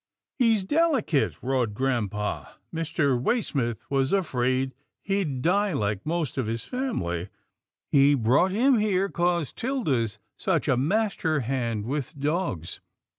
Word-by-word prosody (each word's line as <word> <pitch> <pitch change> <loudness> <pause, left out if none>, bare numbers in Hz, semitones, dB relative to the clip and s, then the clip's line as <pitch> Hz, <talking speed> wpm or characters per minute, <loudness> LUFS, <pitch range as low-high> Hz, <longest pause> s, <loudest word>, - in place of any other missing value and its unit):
" - - -64
" - - -56
He's 225 -5 +4
delicate," 290 - +2
roared 125 -5 0
grampa, 105 -5 -2
" - - -42
Mr. 155 -6 0
Waysmith 130 - -1
was 135 0 +1
afraid 130 -8 +1 0.3
he'd 180 -10 -1
die 200 +2 +2
like 105 -2 -2
most 160 -4 -1
of 125 - -1
his 115 +1 -2
family. 95 - -2 0.6
He 140 +1 +6
brought 130 +9 +3
him 240 +5 +3
here 200 -2 +1
'cause 175 -5 0
'Tilda's 145 - -1 0.2
such - - 0
a 130 - +4
master 160 - +1
hand 115 -4 -2
with 140 +2 -4
dogs. 145 - -2
140 Hz, 135 wpm, -26 LUFS, 120-190 Hz, 0.6 s, He